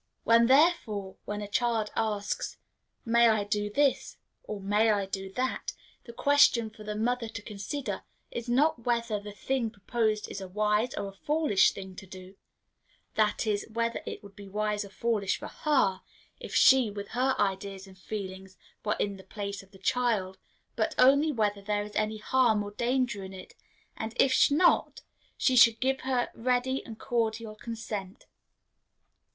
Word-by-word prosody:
When, 230 0 +5
therefore, 255 - +2
a 205 0 -4
child 225 0 0
asks, 210 -2 -2 0.5
"May 235 0 +5
I 215 -2 +2
do 205 0 -1
this?" 280 +5 +1 0.3
or, 215 - -6
"May 205 +3 +2
I 205 -2 +2
do 190 0 -5
that?" 255 +3 -2 0.3
the 235 - -9
question 240 -4 +4
for 215 0 -13
the 210 0 -4
mother 235 +2 0
to 220 -2 -7
consider 215 +7 -5 0.3
is 235 0 -5
not 275 +1 +2
whether 235 -3 0
the 205 0 -9
thing 240 +3 -2
proposed 215 +1 -1
is 195 - -6
a 190 - -6
wise 210 +6 0
or 200 -9 -3
a - - -13
foolish 290 -2 +3
thing 190 -1 -9
to 190 - -10
do 185 +1 -11 0.8
that 215 +1 +1
is, 205 -2 -1
whether 230 +1 -1
it - - -6
would 200 -1 -13
be 200 -1 -11
wise 210 +1 -1
or 200 - -10
foolish 210 -2 -1
for - - -8
her, 230 -11 +1 0.4
if - - -7
she, 260 -4 +6
with 200 0 -7
her 260 +2 +1
ideas 195 0 -2
and 190 -1 -15
feelings, 190 -2 -7 0.3
were 210 - 0
in 200 -1 -1
the 190 - -13
place 200 -1 -5
of 195 - -19
the 195 - -16
child 195 -2 0 0.4
but - - -1
only 280 +4 +5
whether 210 -5 0
there 205 +1 -1
is 210 0 -10
any 215 0 0
harm 220 -1 +2
or 205 - -7
danger 240 -2 -1
in 190 0 -8
it; 185 - -11 0.4
and 220 0 -5
if 260 +1 +4
not, 310 +5 +3 0.4
she 260 - +2
should 230 -2 +7
give 265 +1 +1
her 255 -2 0
ready 255 +2 0
and 225 -2 -8
cordial 225 -2 -2
consent. 215 -3 -6
215 Hz, 170 wpm, -29 LUFS, 200-245 Hz, 0.8 s, should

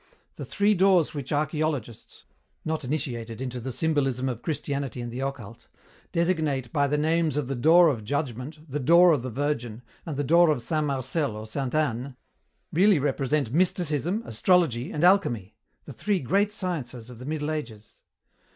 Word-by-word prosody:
The - - -7
three 205 +1 +2
doors 185 -4 +3
which 140 -4 -6
archeologists 150 -5 -2 0.4
not 155 -1 -2
initiated 125 -5 -4
into 125 -1 -4
the 130 +2 -5
symbolism 135 -3 0
of 120 -2 -5
Christianity 140 -4 -3
and 120 -1 -5
the 125 - -6
occult 125 -5 -6 0.4
designate 155 -7 0
by 145 -1 +2
the 150 +2 0
names 160 0 +1
of 145 -4 -1
the 135 - -2
door 165 +8 +6
of 120 -7 -2
Judgment, 145 +4 -4
the 145 +1 -3
door 170 +6 +6
of 145 -6 +2
the 130 - -5
Virgin, 125 -3 -3 0.2
and 155 -4 -5
the 145 - 0
door 170 +4 +5
of 150 -4 +2
Saint 155 +2 -1
Marcel 135 -1 -1
or 110 - -7
Saint 130 +5 -4
Anne, 135 -3 -1 0.6
really 195 +2 +5
represent 140 -2 0
Mysticism, 175 - 0
Astrology, 135 - +1
and 150 - -2
Alchemy, 120 - +2 0.3
the 140 - -9
three 195 - -1
great 200 +9 +1
sciences 130 - -5
of 120 - -12
the 125 - -9
Middle 150 +1 -2
Ages. 115 -8 -7
145 Hz, 170 wpm, -26 LUFS, 125-160 Hz, 0.6 s, door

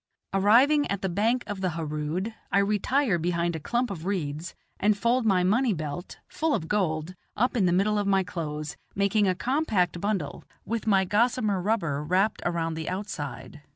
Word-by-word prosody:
Arriving 245 +10 +4
at 200 -1 -2
the - - +1
bank 225 +7 +1
of 205 -3 -5
the 185 -3 0
Harood, 160 +6 -3 0.2
I - - +3
retire 210 +2 +2
behind 170 0 0
a - - -3
clump 240 +8 -1
of 165 -5 -6
reeds, 170 -3 -3 0.2
and 210 0 +3
fold 235 +3 +2
my 185 -3 +3
money 225 +5 +3
belt, 155 +1 -5
full 315 -2 0
of 160 - -3
gold, 175 -4 -1 0.2
up 245 +4 +1
in 200 -6 +3
the - - +2
middle 205 +4 +2
of 205 - -1
my 195 -1 +3
clothes, 155 -4 -5 0.2
making 200 +1 +2
a 185 - +2
compact 200 - 0
bundle, 200 -8 -2 0.2
with 225 0 -3
my 195 -2 +4
gossamer 210 -1 +1
rubber 170 -9 0
wrapped 185 +7 +1
around 165 -1 -1
the 160 0 -4
outside. 150 -8 -6
190 Hz, 180 wpm, -27 LUFS, 170-215 Hz, 0.2 s, Arriving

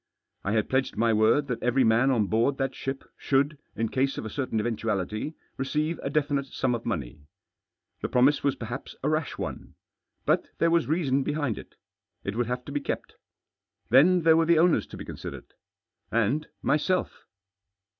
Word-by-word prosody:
I 100 - -1
had 110 -1 +1
pledged 130 -3 0
my 115 0 +3
word 110 +7 +4
that 125 -4 -3
every 125 +2 +3
man 115 +3 +4
on 115 -6 +3
board 115 +7 +1
that 135 -1 -1
ship 135 0 -4
should, 140 +2 +1 0.2
in 115 0 -1
case 135 +1 0
of - - -4
a 110 - -5
certain 130 -4 -1
eventuality, 110 - -2 0.2
receive 150 +5 -1
a - - -2
definite 140 -1 0
sum 130 -1 -1
of 120 -1 -4
money. 70 -1 -4 0.7
The - - -2
promise 130 +4 +3
was 140 - +2
perhaps 120 +3 -6
a 145 - +2
rash 155 -2 -1
one. - - -6 0.5
But - - +2
there 165 0 +3
was 170 -1 +3
reason 140 -4 +1
behind 145 -4 -1
it. - - -13 0.5
It 100 - -3
would 120 -1 0
have 125 +1 -3
to - - -7
be 145 0 -1
kept. - - -4 0.7
Then 170 +8 +6
there 160 0 +6
were 165 0 +4
the 170 -1 +5
owners 170 +1 +3
to - - -10
be - - -7
considered - - -7 0.4
— - - -50
and 115 +7 +1 0.2
myself. 180 +5 0
135 Hz, 185 wpm, -27 LUFS, 115-150 Hz, 0.7 s, Then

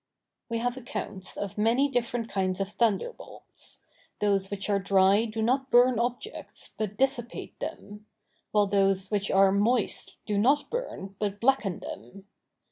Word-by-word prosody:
We 230 - -1
have 245 +2 -1
accounts 210 -6 -5
of 200 0 -4
many 235 +6 +3
different 240 -3 -1
kinds 190 -2 -1
of 195 0 -1
thunderbolts. 225 - -3 0.4
Those 200 -2 +2
which 200 -1 -4
are 200 -1 +2
dry 195 +2 +4
do 220 0 -3
not 265 +3 +1
burn 245 -1 +5
objects, 245 - -3
but 210 -2 -4
dissipate 260 -2 -1
them; 210 +1 -7 0.4
while 210 -1 +3
those 195 -1 +2
which 205 -1 0
are 195 0 +5
moist 210 +3 +1
do 205 -2 0
not 275 +7 +2
burn, 330 - -5
but 205 -1 -2
blacken 230 -7 +1
them. 155 - -9
210 Hz, 145 wpm, -28 LUFS, 195-240 Hz, 0.4 s, burn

